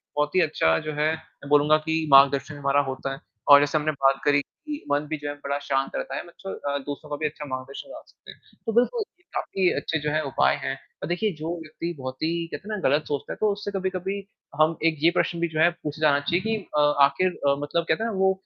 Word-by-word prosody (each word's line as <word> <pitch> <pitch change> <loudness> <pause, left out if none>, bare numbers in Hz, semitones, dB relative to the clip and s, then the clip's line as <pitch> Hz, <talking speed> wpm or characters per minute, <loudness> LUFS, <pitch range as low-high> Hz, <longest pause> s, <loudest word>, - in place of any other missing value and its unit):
बहुत 150 +2 0
ही 185 - +6
अच्छा 80 - +2
जो - - -3
है 155 +1 +3
मैं 160 -2 -14
बोलूँगा 145 +1 +5
कि 160 0 +1
मार्गदर्शन 140 +2 +6
हमारा 140 0 +2
होता 135 +1 -4
है 135 - -8 0.3
और 145 0 +11
जैसे 145 +2 +1
हमने 155 0 0
बात 135 -2 +2
करी 145 -1 +4
कि 295 - -9
मन 145 +1 +1
भी 155 - -2
जो 145 - -7
है - - -3
बड़ा 140 0 -1
शांत 135 -1 -1
रहता - - -3
है - - -4
मतलब 195 +3 -8
अ, 140 - 0
दूसरों 145 +2 -7
का 145 - 0
भी 155 - -3
अच्छा 150 0 -4
मार्गदर्शन 130 0 -6
करा - - -9
सकते - - -15
हैं, - - -17 0.3
तो 225 - 0
बिल्कुल 335 - +2 0.2
ये 355 - -31
काफ़ी 190 -2 +1
अच्छी 160 - -1
जो 150 0 -2
है 155 +1 +1
उपाय 135 - +2
हैं - - -1 0.3
और - - -2
देखिए 200 +4 0
जो 165 +3 -3
व्यक्ति 165 +2 -5
बहुत 130 0 -5
ही 160 - +2 0.2
कहते 210 - -7
हैं - - -1
ना - - +2
गलत 145 +3 +2
सोचता 145 -2 -3
है - - -10
तो 215 -1 +3
उससे 205 0 -5
कभी-कभी 190 0 -2 0.4
हम 160 +1 +3
एक 160 -1 +3
ये 170 - +6
प्रश्न 170 - +1
भी 170 - +1
जो 155 -1 -4
है 170 - +6
पूछे 150 +1 -5
जाना 145 -2 +4
चाहिए 170 +5 0
कि 220 0 0 0.2
अ, - - +4 0.2
आखिर 140 +7 +3 0.2
अ, 140 - +4
मतलब 150 +3 -1
कहते 160 +8 +2
हैं 230 - 0
ना 200 - -4
वो 190 0 +4
155 Hz, 255 wpm, -25 LUFS, 140-175 Hz, 0.4 s, और